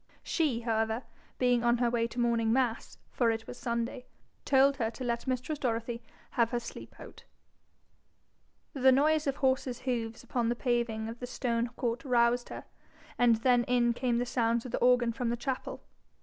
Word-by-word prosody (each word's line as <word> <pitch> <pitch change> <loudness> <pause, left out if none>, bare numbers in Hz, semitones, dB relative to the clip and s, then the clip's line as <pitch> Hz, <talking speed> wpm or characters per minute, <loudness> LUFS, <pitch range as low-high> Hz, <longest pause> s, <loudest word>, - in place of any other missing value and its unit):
She, 285 -9 0
however, 225 +1 -1 0.3
being 245 -1 +2
on 240 0 +3
her 240 0 +2
way 230 -1 +1
to 235 - -7
morning 230 -2 +2
mass, 245 -2 0
for 240 -2 +2
it 225 0 -2
was 245 - -9
Sunday, 235 +1 -3 0.4
told 275 0 +4
her 225 -4 0
to 255 - -8
let 235 +1 -2
mistress 260 +4 -2
Dorothy 235 -2 -2 0.3
have 235 -3 +2
her 240 - -1
sleep 235 - -10
out. - - -12 1.5
The 265 -1 +5
noise 300 +3 +3
of 275 - 0
horses' 260 -2 0
hoofs 230 -3 -3
upon 235 -2 -1
the 240 - 0
paving 235 -3 -1
of 230 +1 -7
the 245 - -5
stone 235 -2 -1
court 235 -1 -2
roused 240 -1 +2
her, - - -7 0.6
and 240 -2 +5
then 245 -2 +4
in 240 -1 +2
came 240 -1 0
the 245 - 0
sounds 235 -1 0
of 250 - -6
the - - -1
organ 245 -1 +3
from 245 0 -2
the 240 - -1
chapel. 255 +2 -4
240 Hz, 180 wpm, -30 LUFS, 235-255 Hz, 1.5 s, The